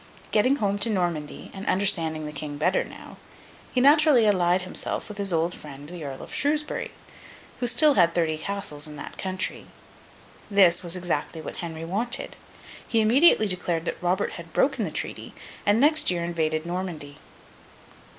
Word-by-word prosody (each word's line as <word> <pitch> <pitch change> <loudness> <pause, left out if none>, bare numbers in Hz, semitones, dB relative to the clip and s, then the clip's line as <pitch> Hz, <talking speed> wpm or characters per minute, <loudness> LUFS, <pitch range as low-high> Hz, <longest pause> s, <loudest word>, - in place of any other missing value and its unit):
Getting 250 +6 +3
home 205 -5 -1
to 205 - +2
Normandy, 175 -7 -3
and 195 - -7
understanding 165 -5 +1
the 150 - -5
King 145 0 -6
better 180 +5 +1
now, - - -12 0.5
he 255 - +1
naturally 290 -2 +5
allied 180 -3 +3
himself 185 - -3
with 210 -1 -9
his 200 -1 0
old 165 +1 0
friend 145 -3 -10
the 175 -2 -8
Earl 135 -2 -7
of - - -10
Shrewsbury, 300 +1 0 0.7
who 245 - -1
had - - +5
still 300 +4 +5
thirty 170 - +2
castles 195 -6 -3
in 150 - -10
that 145 - -9
country. 185 0 -3 0.8
This 190 -4 +5
was 175 -1 0
exactly 175 -3 -3
what 155 - -8
Henry 165 -1 -6
wanted. 230 +9 -2 0.5
He 230 - +1
immediately 230 +2 +5
declared 180 -4 0
that - - -4
Robert 180 +3 0
had 170 -1 -10
broken 265 -5 +1
the - - -3
treaty, - - -5 0.3
and 205 +2 +4
next 305 +4 +4
year 175 -2 0
invaded 160 -2 -1
Normandy. 170 -5 -5
180 Hz, 165 wpm, -25 LUFS, 160-215 Hz, 0.8 s, naturally